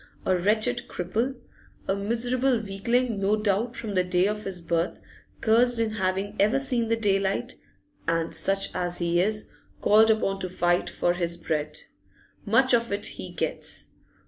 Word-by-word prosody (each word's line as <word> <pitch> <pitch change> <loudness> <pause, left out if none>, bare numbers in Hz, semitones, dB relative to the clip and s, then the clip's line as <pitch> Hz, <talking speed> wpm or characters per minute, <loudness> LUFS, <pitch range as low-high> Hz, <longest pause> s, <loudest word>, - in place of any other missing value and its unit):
A 185 - +3
wretched 215 +6 +1
cripple, 225 +9 -2 0.5
a - - +2
miserable 240 +5 0
weakling 225 +3 0
no 200 +2 +2
doubt 215 +3 0
from 215 -3 -5
the 185 -1 +2
day 180 0 +2
of 210 +1 -2
his 190 -2 -4
birth, 170 0 -1 0.4
cursed 235 +2 +3
in 225 -1 0
having 195 0 -2
ever 215 +6 +4
seen 250 -4 0
the 230 - +2
daylight, 200 +3 0 0.5
and, 165 0 0
such 195 +5 +2
as 175 -1 -2
he 175 0 +1
is, 215 +2 -1 0.3
called 220 +2 +5
upon 195 -3 +1
to 185 - -4
fight 175 -1 +1
for 175 - 0
his 170 -1 -2
bread. 150 -2 -2 0.7
Much 260 -1 +4
of 235 -2 +2
it 200 +1 -1
he - - -4
gets! - - -3
200 Hz, 160 wpm, -26 LUFS, 180-230 Hz, 0.7 s, called